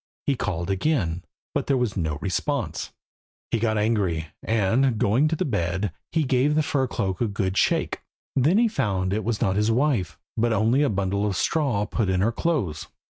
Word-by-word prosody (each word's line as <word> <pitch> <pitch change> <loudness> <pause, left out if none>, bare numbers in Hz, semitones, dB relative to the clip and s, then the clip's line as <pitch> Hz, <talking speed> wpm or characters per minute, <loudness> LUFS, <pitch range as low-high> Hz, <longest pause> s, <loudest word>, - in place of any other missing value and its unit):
He 140 - +2
called 95 -6 -2
again, 95 - 0 0.3
but - - -1
there 135 - +3
was 125 -5 -1
no 80 -5 -1
response. 125 +7 -2 0.6
He 115 - +1
got 110 -1 +1
angry, 100 -7 0
and, 115 +3 +2
going 120 +6 +3
to 160 - 0
the - - -1
bed, 95 - -1 0.2
he 160 - +2
gave 135 +2 +2
the 155 - +3
fur 135 -2 0
cloak 95 -5 -2
a 120 - +2
good 100 -2 -2
shake. - - +1 0.3
Then 150 +9 +4
he 235 +1 +5
found 95 - -1
that 100 - +1
it 110 - -3
was 110 0 -2
not 95 0 +1
his 105 +1 +2
wife, 115 - +1 0.2
but 115 0 +1
only 110 +6 +3
a 145 - +3
bundle 100 0 0
of 95 -3 -1
straw 135 -10 +1
put 105 -2 -1
in 95 -1 +1
her 110 +4 +2
clothes. 95 - -1
110 Hz, 195 wpm, -25 LUFS, 95-130 Hz, 0.6 s, he